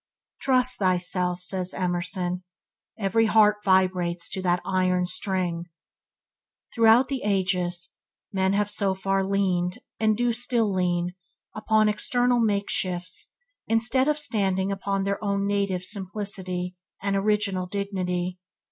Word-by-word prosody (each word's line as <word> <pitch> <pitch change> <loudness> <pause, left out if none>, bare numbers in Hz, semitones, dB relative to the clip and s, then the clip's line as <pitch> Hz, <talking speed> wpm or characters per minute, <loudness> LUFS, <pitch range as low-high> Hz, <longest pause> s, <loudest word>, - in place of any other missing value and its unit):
"Trust 255 -1 +2
thyself", 180 -1 0
says 185 0 -1
Emerson, 180 0 -2 0.5
'every 220 +2 +2
heart 210 -1 +5
vibrates 185 -3 +1
to 190 - -3
that 180 -1 +1
iron 185 -1 +1
string". 180 -2 -2 1.1
Throughout 230 +2 +5
the 270 -1 -3
ages 180 -3 +1 0.3
men 190 0 +1
have 205 0 +1
so 200 -2 0
far 195 0 0
leaned, 185 -2 0 0.2
and 215 -1 +2
do 240 0 +1
still 225 -3 +1
lean, 175 -1 0 0.4
upon 215 0 +2
external 245 +3 +1
makeshifts 185 -5 0 0.4
instead 240 +4 +2
of 300 0 +2
standing 195 -8 +1
upon 195 0 -2
their 200 +2 -2
own 200 -1 0
native 200 -2 -1
simplicity 185 -2 -2 0.2
and 200 0 -1
original 195 -2 0
dignity. 185 -2 -3
195 Hz, 120 wpm, -25 LUFS, 180-210 Hz, 1.1 s, heart